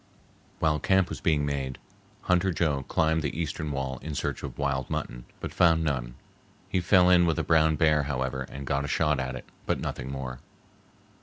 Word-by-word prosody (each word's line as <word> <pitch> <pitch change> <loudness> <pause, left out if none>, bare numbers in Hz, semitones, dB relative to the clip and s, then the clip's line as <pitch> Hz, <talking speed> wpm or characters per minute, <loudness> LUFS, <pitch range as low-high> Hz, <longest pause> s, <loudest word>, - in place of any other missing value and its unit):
While 75 -1 +1
camp 95 +3 +2
was - - -6
being 75 -3 +2
made, 70 -2 -3 0.4
Hunter 90 +1 +2
Joe 75 -4 0
climbed 80 +4 +1
the 75 +1 -3
eastern 80 -1 -3
wall 65 -2 -3
in 75 +2 -5
search - - -2
of - - -7
wild 70 -2 -1
mutton, - - -4
but - - -6
found 80 -2 +4
none. 65 -6 -2 0.5
He 95 - 0
fell 90 +1 +5
in 90 -1 +6
with 80 - +1
a - - 0
brown 80 -1 +4
bear, 75 -1 +3
however, 65 -1 -2
and 70 0 -7
got 70 +1 0
a - - -3
shot 75 -1 +1
at 65 0 -3
it, 65 - -8 0.2
but - - +1
nothing 65 +1 -4
more. 65 -2 -5
75 Hz, 190 wpm, -27 LUFS, 65-80 Hz, 0.5 s, in